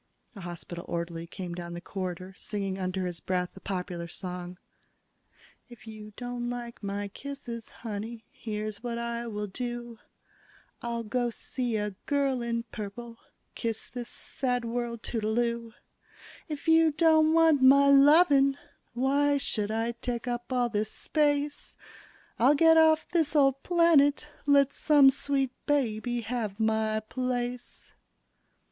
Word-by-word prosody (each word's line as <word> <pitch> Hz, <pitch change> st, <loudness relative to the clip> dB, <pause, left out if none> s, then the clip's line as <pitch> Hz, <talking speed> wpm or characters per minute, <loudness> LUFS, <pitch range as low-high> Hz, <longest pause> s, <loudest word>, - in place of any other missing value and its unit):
A 200 Hz, -, -9 dB
hospital 175 Hz, 0 st, -7 dB
orderly 170 Hz, 0 st, -4 dB
came 175 Hz, 0 st, -6 dB
down 170 Hz, 0 st, -6 dB
the -, -, -5 dB
corridor, 185 Hz, 0 st, -5 dB
singing 195 Hz, -2 st, -4 dB
under 185 Hz, 0 st, -2 dB
his 175 Hz, -2 st, -4 dB
breath 180 Hz, -1 st, -2 dB
a -, -, -10 dB
popular 180 Hz, -3 st, -4 dB
song: 180 Hz, +1 st, -5 dB, 1.1 s
If 240 Hz, -1 st, -14 dB
you 215 Hz, -1 st, -10 dB
don't 245 Hz, -1 st, -4 dB
like 240 Hz, -1 st, -6 dB
my 200 Hz, 0 st, -3 dB
kisses, 235 Hz, -2 st, -7 dB
honey, 225 Hz, +1 st, -6 dB
Here's 215 Hz, -1 st, -5 dB
what 235 Hz, -1 st, -3 dB
I 235 Hz, 0 st, -3 dB
will 210 Hz, -2 st, -3 dB
do: 240 Hz, +2 st, -5 dB, 0.8 s
I'll 235 Hz, -1 st, -3 dB
go 240 Hz, +2 st, -1 dB
see 240 Hz, 0 st, -3 dB
a 210 Hz, 0 st, -2 dB, 0.2 s
girl 275 Hz, -3 st, +1 dB
in 235 Hz, 0 st, -2 dB
purple, 230 Hz, +3 st, -7 dB, 0.3 s
Kiss 225 Hz, -1 st, -4 dB
this 245 Hz, -2 st, -6 dB
sad 250 Hz, -2 st, -3 dB
world 235 Hz, -1 st, -3 dB
toodle 220 Hz, -1 st, -2 dB
oo. 235 Hz, -1 st, -1 dB, 0.8 s
If 300 Hz, +1 st, -6 dB
you 325 Hz, 0 st, +6 dB
don't 315 Hz, 0 st, +4 dB
want 325 Hz, -4 st, +5 dB
my 280 Hz, +2 st, +7 dB
lovin', 280 Hz, -1 st, +6 dB, 0.4 s
Why 285 Hz, +3 st, +2 dB
should 210 Hz, -6 st, -1 dB
I 225 Hz, +2 st, -1 dB
take 235 Hz, +1 st, -5 dB
up 240 Hz, +1 st, -4 dB
all 250 Hz, -1 st, +2 dB
this 215 Hz, -1 st, -1 dB
space? 290 Hz, -1 st, -1 dB, 0.6 s
I'll 260 Hz, +6 st, +5 dB
get 325 Hz, +2 st, +6 dB
off 315 Hz, -1 st, +5 dB
this 320 Hz, -3 st, +1 dB
old 275 Hz, -2 st, +4 dB
planet, 305 Hz, -4 st, +3 dB, 0.2 s
Let 280 Hz, -1 st, +5 dB
some 290 Hz, -3 st, +6 dB
sweet 275 Hz, -1 st, 0 dB, 0.2 s
baby 240 Hz, -4 st, 0 dB
have 220 Hz, -2 st, -3 dB
my 220 Hz, 0 st, +1 dB
place. 245 Hz, +1 st, -4 dB
235 Hz, 140 wpm, -28 LUFS, 210-275 Hz, 1.1 s, my